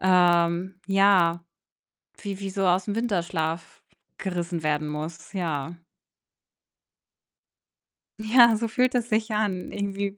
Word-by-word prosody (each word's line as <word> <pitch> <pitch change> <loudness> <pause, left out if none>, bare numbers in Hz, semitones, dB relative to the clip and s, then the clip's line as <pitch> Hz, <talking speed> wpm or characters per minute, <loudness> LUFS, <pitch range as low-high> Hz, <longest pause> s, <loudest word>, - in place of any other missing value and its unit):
ähm 180 0 +2
ja, 195 -4 +3 0.8
wie 200 -2 -5
wie 195 - -4
so 195 +1 -4
aus'm 185 +3 +1
Winterschlaf 170 -7 -2 0.4
gerissen 175 -3 -3
werden 150 0 0
muss, 155 +2 -7
ja. 165 -3 -3 2.4
Ja, 235 +1 +6
so 230 - -2
fühlt 250 +3 +1
es 240 -1 -1
sich 220 +1 0
an 205 -4 -2
irgendwie 200 0 -3
185 Hz, 105 wpm, -25 LUFS, 170-205 Hz, 2.4 s, Ja